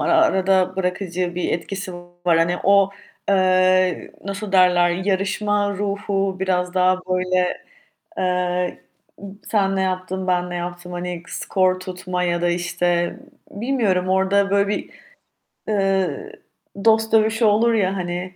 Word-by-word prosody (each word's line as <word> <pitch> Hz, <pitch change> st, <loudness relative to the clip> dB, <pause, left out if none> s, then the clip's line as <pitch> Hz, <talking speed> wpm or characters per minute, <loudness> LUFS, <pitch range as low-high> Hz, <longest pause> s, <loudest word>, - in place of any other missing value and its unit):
Ara -, -, +1 dB
arada 190 Hz, -, +2 dB
bırakıcı 180 Hz, -1 st, -2 dB
bir 180 Hz, -, -1 dB
etkisi 185 Hz, +3 st, -4 dB, 0.3 s
var. 170 Hz, -2 st, +4 dB
Hani 175 Hz, +2 st, +2 dB
o, 200 Hz, 0 st, +5 dB, 0.4 s
eee, 185 Hz, -2 st, +2 dB
nasıl 200 Hz, +1 st, -5 dB
derler 180 Hz, -2 st, +5 dB
yarışma 200 Hz, +2 st, 0 dB
ruhu 200 Hz, -1 st, -2 dB
biraz 180 Hz, -1 st, 0 dB
daha 185 Hz, 0 st, +3 dB
böyle, 185 Hz, 0 st, 0 dB, 0.5 s
eee, 180 Hz, -, -1 dB, 0.6 s
sen 195 Hz, -3 st, 0 dB
ne 190 Hz, -, 0 dB
yaptın, 185 Hz, 0 st, -3 dB
ben 180 Hz, -1 st, 0 dB
ne 175 Hz, -, -5 dB
yaptım 175 Hz, 0 st, -6 dB
hani 175 Hz, -1 st, -5 dB
skor 185 Hz, -1 st, 0 dB
tutma 185 Hz, 0 st, -4 dB
ya 170 Hz, -1 st, 0 dB
da, 175 Hz, -, +2 dB
işte, 175 Hz, 0 st, -1 dB, 0.3 s
bilmiyorum. 205 Hz, -6 st, 0 dB
Orada 190 Hz, +1 st, +2 dB
böyle 200 Hz, 0 st, +3 dB
bir, 205 Hz, -, -3 dB, 0.8 s
eee, 195 Hz, -, 0 dB, 0.5 s
dost 220 Hz, 0 st, +3 dB
dövüşü 220 Hz, +1 st, +3 dB
olur 220 Hz, +3 st, +4 dB
ya, 195 Hz, -3 st, +1 dB
hani 180 Hz, +1 st, -4 dB
185 Hz, 130 wpm, -21 LUFS, 180-200 Hz, 0.8 s, o